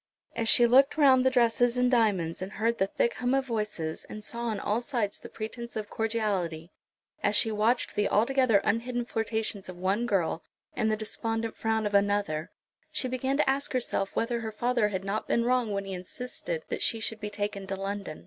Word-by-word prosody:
As 225 Hz, -1 st, +1 dB
she 240 Hz, -, +7 dB
looked 270 Hz, +5 st, +5 dB
round 270 Hz, -4 st, +6 dB
on -, -, +3 dB
the -, -, +6 dB
dresses 245 Hz, 0 st, +2 dB
and 250 Hz, 0 st, +3 dB
diamonds, 195 Hz, -9 st, +1 dB
and 190 Hz, +2 st, -5 dB
heard 230 Hz, +2 st, 0 dB
the 195 Hz, -, +2 dB
thick 235 Hz, +4 st, 0 dB
hum 250 Hz, +2 st, +1 dB
of 270 Hz, -1 st, +1 dB
voices, 210 Hz, -9 st, -3 dB
and 210 Hz, 0 st, -8 dB
saw 235 Hz, +2 st, -3 dB
on 220 Hz, -3 st, -1 dB
all 210 Hz, +4 st, 0 dB
sides 240 Hz, -6 st, -2 dB
the -, -, -10 dB
pretence 235 Hz, +2 st, -6 dB
of 215 Hz, -1 st, -5 dB
cordiality, 200 Hz, -7 st, -2 dB, 0.5 s
as -, -, +2 dB
she 225 Hz, -, +5 dB
watched 220 Hz, +4 st, +1 dB
the 205 Hz, -, +1 dB
altogether 240 Hz, 0 st, +3 dB
unhidden 240 Hz, +3 st, -1 dB
flirtations 220 Hz, -4 st, -3 dB
of 180 Hz, -, -8 dB
one 195 Hz, +6 st, 0 dB
girl, 175 Hz, -6 st, 0 dB, 0.3 s
and 220 Hz, -2 st, +1 dB
the 215 Hz, -, 0 dB
despondent 225 Hz, +1 st, -2 dB
frown 220 Hz, -1 st, 0 dB
of 205 Hz, -, -2 dB
another, 200 Hz, -6 st, +1 dB, 0.4 s
she 255 Hz, -, -1 dB
began 260 Hz, +2 st, -1 dB
to 300 Hz, -, +2 dB
ask 275 Hz, +1 st, 0 dB
herself 235 Hz, -6 st, -1 dB
whether 235 Hz, +1 st, 0 dB
her 220 Hz, -1 st, -4 dB
father 240 Hz, 0 st, +1 dB
had 190 Hz, -2 st, -3 dB
not 200 Hz, +2 st, -3 dB
been 235 Hz, -, +1 dB
wrong 250 Hz, -3 st, +1 dB
when 200 Hz, 0 st, -2 dB
he 195 Hz, -, -5 dB
insisted 250 Hz, -, -5 dB
that -, -, -3 dB
she 225 Hz, -, +2 dB
should 220 Hz, 0 st, -1 dB
be 210 Hz, -1 st, -4 dB
taken 205 Hz, -1 st, -4 dB
to 195 Hz, -, -2 dB
London. 195 Hz, -4 st, -5 dB
220 Hz, 205 wpm, -28 LUFS, 200-240 Hz, 0.5 s, she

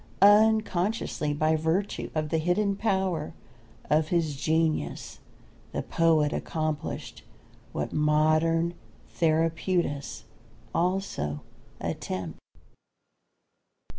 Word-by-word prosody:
Unconsciously, 210 Hz, -5 st, +3 dB
by 155 Hz, +2 st, +2 dB
virtue 160 Hz, +6 st, -1 dB
of 155 Hz, -1 st, -1 dB
the 160 Hz, -, +1 dB
hidden 195 Hz, +5 st, +1 dB
power 190 Hz, -7 st, -1 dB, 0.5 s
of 155 Hz, +1 st, +2 dB
his 160 Hz, -3 st, 0 dB
genius, 155 Hz, -, -1 dB, 0.5 s
the -, -, -2 dB
poet 160 Hz, -3 st, +2 dB
accomplished 155 Hz, -2 st, -3 dB, 0.5 s
what 75 Hz, -, -3 dB
modern 155 Hz, +2 st, +2 dB, 0.4 s
therapeutists 165 Hz, -2 st, 0 dB, 0.5 s
also 170 Hz, -, -1 dB, 0.4 s
attempt. 90 Hz, -4 st, -4 dB
160 Hz, 75 wpm, -27 LUFS, 150-180 Hz, 0.5 s, Unconsciously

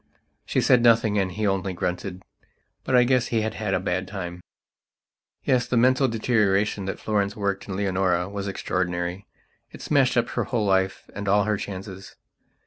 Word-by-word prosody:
She -, -, +1 dB
said 125 Hz, -, +4 dB
nothing 115 Hz, -3 st, +4 dB
and 95 Hz, -1 st, 0 dB
he 105 Hz, +4 st, -2 dB
only 95 Hz, -1 st, 0 dB
grunted. 90 Hz, +1 st, -4 dB, 0.6 s
But 130 Hz, -, 0 dB
I 125 Hz, -, +7 dB
guess 125 Hz, -1 st, +2 dB
he 115 Hz, -2 st, 0 dB
had 110 Hz, +1 st, -3 dB, 0.2 s
a -, -, +1 dB
bad 95 Hz, 0 st, -2 dB
time. 90 Hz, -3 st, -6 dB, 1.0 s
Yes, 125 Hz, -1 st, +2 dB
the 125 Hz, -, 0 dB
mental 130 Hz, +3 st, +4 dB
deterioration 105 Hz, -4 st, +1 dB
that 95 Hz, -, -4 dB
Florence 105 Hz, -2 st, -1 dB
worked 100 Hz, -2 st, -2 dB
in 95 Hz, -, -3 dB
Leonora 95 Hz, -3 st, 0 dB
was 100 Hz, 0 st, -5 dB
extraordinary; 90 Hz, -1 st, -2 dB, 0.4 s
it -, -, -11 dB
smashed 135 Hz, -4 st, +2 dB
up 120 Hz, -, +2 dB
her -, -, -2 dB
whole 115 Hz, -5 st, -1 dB
life 95 Hz, -1 st, 0 dB
and 100 Hz, 0 st, -6 dB
all 100 Hz, +1 st, +4 dB
her 105 Hz, 0 st, 0 dB
chances. 95 Hz, -1 st, -7 dB
100 Hz, 170 wpm, -24 LUFS, 95-115 Hz, 1.0 s, I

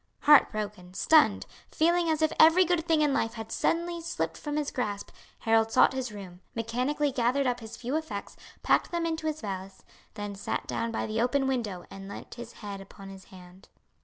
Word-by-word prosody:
Heart 295 Hz, -1 st, +7 dB
broken, 205 Hz, -4 st, -6 dB
stunned, 310 Hz, +6 st, +4 dB, 0.2 s
feeling 340 Hz, +1 st, +2 dB
as 315 Hz, 0 st, +1 dB
if 315 Hz, -, +2 dB
every 325 Hz, +4 st, +7 dB
good 340 Hz, -1 st, 0 dB
thing 320 Hz, -2 st, +3 dB
in 290 Hz, -2 st, +2 dB
life 225 Hz, -3 st, 0 dB
had 225 Hz, -1 st, -7 dB
suddenly 340 Hz, 0 st, 0 dB
slipped 335 Hz, -, -3 dB
from 295 Hz, -1 st, -5 dB
his 300 Hz, -1 st, -1 dB
grasp, 205 Hz, -5 st, -3 dB, 0.3 s
Harold 225 Hz, 0 st, +2 dB
sought -, -, +5 dB
his 260 Hz, -3 st, -3 dB
room, 190 Hz, -3 st, -10 dB
mechanically 250 Hz, +6 st, -1 dB
gathered 255 Hz, +2 st, +1 dB
up 245 Hz, -1 st, 0 dB
his 220 Hz, -2 st, -9 dB
few 250 Hz, +4 st, -3 dB
effects, 310 Hz, -11 st, -4 dB, 0.3 s
packed -, -, +3 dB
them 340 Hz, -1 st, -1 dB
into 320 Hz, -1 st, -2 dB
his 310 Hz, 0 st, -3 dB
valise, 195 Hz, -2 st, -6 dB, 0.3 s
then 205 Hz, -1 st, -5 dB
sat 200 Hz, -, -3 dB
down 230 Hz, 0 st, -2 dB
by 225 Hz, -, -2 dB
the 220 Hz, +1 st, -1 dB
open 270 Hz, +3 st, +1 dB
window 225 Hz, -9 st, -2 dB
and 195 Hz, 0 st, -9 dB
leant -, -, -9 dB
his 235 Hz, -1 st, -9 dB
head 200 Hz, -2 st, -7 dB
upon 195 Hz, 0 st, -12 dB
his 190 Hz, -1 st, -11 dB
hand. 180 Hz, 0 st, -15 dB
240 Hz, 195 wpm, -28 LUFS, 205-305 Hz, 0.3 s, Heart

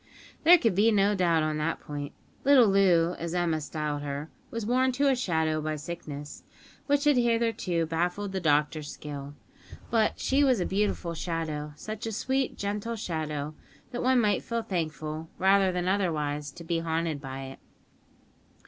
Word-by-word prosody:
There 350 Hz, +2 st, +9 dB
could 230 Hz, -, +1 dB
be 210 Hz, +5 st, +4 dB
no 205 Hz, -1 st, +3 dB
doubt 170 Hz, -5 st, +2 dB
on 155 Hz, 0 st, -1 dB
that 165 Hz, +2 st, -1 dB
point. 145 Hz, -1 st, -6 dB, 0.3 s
Little 270 Hz, -4 st, +7 dB
Loo, 180 Hz, -4 st, +4 dB
as 170 Hz, +1 st, -3 dB
Emma 170 Hz, -3 st, +1 dB
styled 150 Hz, -1 st, -3 dB
her, 145 Hz, +2 st, -5 dB, 0.2 s
was 230 Hz, -2 st, -4 dB
worn 255 Hz, +3 st, +2 dB
to 280 Hz, +3 st, +2 dB
a 265 Hz, -, +3 dB
shadow 160 Hz, -9 st, 0 dB
by 155 Hz, 0 st, -2 dB
sickness, 150 Hz, -2 st, -7 dB, 0.4 s
which 285 Hz, 0 st, +2 dB
had 295 Hz, -3 st, +4 dB
hitherto 230 Hz, -8 st, +1 dB
baffled 175 Hz, +5 st, -1 dB
the 190 Hz, -, -2 dB
doctor's 150 Hz, -2 st, +1 dB
skill. 145 Hz, -1 st, -7 dB, 0.6 s
But 220 Hz, -2 st, +2 dB
she 275 Hz, +2 st, +2 dB
was 260 Hz, -5 st, +3 dB
a 180 Hz, -, 0 dB
beautiful 195 Hz, -3 st, -1 dB
shadow; 160 Hz, -3 st, -3 dB
such 215 Hz, +7 st, -6 dB
a -, -, -2 dB
sweet, 265 Hz, +5 st, -1 dB
gentle 210 Hz, +3 st, -3 dB
shadow, 155 Hz, -7 st, -3 dB, 0.4 s
that 245 Hz, -, -3 dB
one 255 Hz, 0 st, +4 dB
might 210 Hz, -3 st, +2 dB
feel 235 Hz, -1 st, -3 dB
thankful, 160 Hz, -4 st, -3 dB
rather 195 Hz, 0 st, +4 dB
than 180 Hz, 0 st, -2 dB
otherwise, 150 Hz, -7 st, 0 dB
to 170 Hz, -, -10 dB
be 165 Hz, 0 st, -1 dB
haunted 165 Hz, -2 st, -1 dB
by 135 Hz, -1 st, -6 dB
it. 135 Hz, 0 st, -9 dB
175 Hz, 165 wpm, -28 LUFS, 155-215 Hz, 0.6 s, There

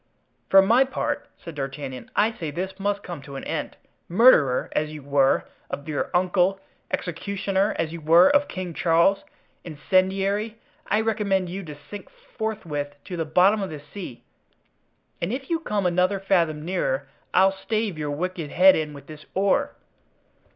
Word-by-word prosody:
"For 195 Hz, 0 st, +7 dB
my 235 Hz, +7 st, +5 dB
part," 265 Hz, -, -3 dB
said 170 Hz, -, -10 dB
D'Artagnan, 135 Hz, -2 st, -6 dB
"I 215 Hz, +2 st, +3 dB
say 160 Hz, -4 st, -4 dB
this 185 Hz, +5 st, -5 dB
must 205 Hz, +1 st, -1 dB
come 175 Hz, -5 st, -7 dB
to 140 Hz, 0 st, -10 dB
an 135 Hz, -, -6 dB
end; -, -, -4 dB, 0.3 s
murderer, 170 Hz, -, +5 dB
as 155 Hz, 0 st, -1 dB
you 150 Hz, -2 st, -9 dB
were, 140 Hz, -1 st, +2 dB, 0.2 s
of 145 Hz, -, -6 dB
your 150 Hz, -2 st, -2 dB
uncle! 185 Hz, +1 st, +2 dB, 0.3 s
executioner, 195 Hz, +3 st, -1 dB
as 165 Hz, 0 st, -2 dB
you 170 Hz, -, -7 dB
were, 165 Hz, +4 st, +6 dB
of 285 Hz, 0 st, +3 dB
King 185 Hz, -2 st, -5 dB
Charles! 170 Hz, +5 st, +3 dB, 0.4 s
incendiary! 195 Hz, +7 st, 0 dB, 0.3 s
I 210 Hz, +2 st, +2 dB
recommend 200 Hz, -5 st, 0 dB
you 190 Hz, +3 st, -5 dB
to 150 Hz, -2 st, -8 dB
sink 190 Hz, +7 st, -10 dB
forthwith 150 Hz, -10 st, -5 dB
to 185 Hz, -, -6 dB
the 165 Hz, -2 st, -2 dB
bottom 185 Hz, +7 st, +4 dB
of 195 Hz, -, -3 dB
the 155 Hz, -, -7 dB
sea; 145 Hz, -4 st, -9 dB, 1.0 s
and 170 Hz, -, -1 dB
if 265 Hz, +5 st, -5 dB
you 330 Hz, -, +1 dB
come 210 Hz, -, -2 dB
another 180 Hz, +3 st, +2 dB
fathom 165 Hz, -6 st, +1 dB
nearer, 140 Hz, -7 st, -1 dB, 0.2 s
I'll 190 Hz, +1 st, +5 dB
stave 215 Hz, 0 st, -2 dB
your 150 Hz, -1 st, -4 dB
wicked 165 Hz, +1 st, -3 dB
head 190 Hz, +4 st, +6 dB
in 155 Hz, -1 st, -2 dB
with 140 Hz, -, -12 dB
this 155 Hz, 0 st, -12 dB
oar." 195 Hz, +1 st, +1 dB
180 Hz, 165 wpm, -24 LUFS, 155-200 Hz, 1.0 s, For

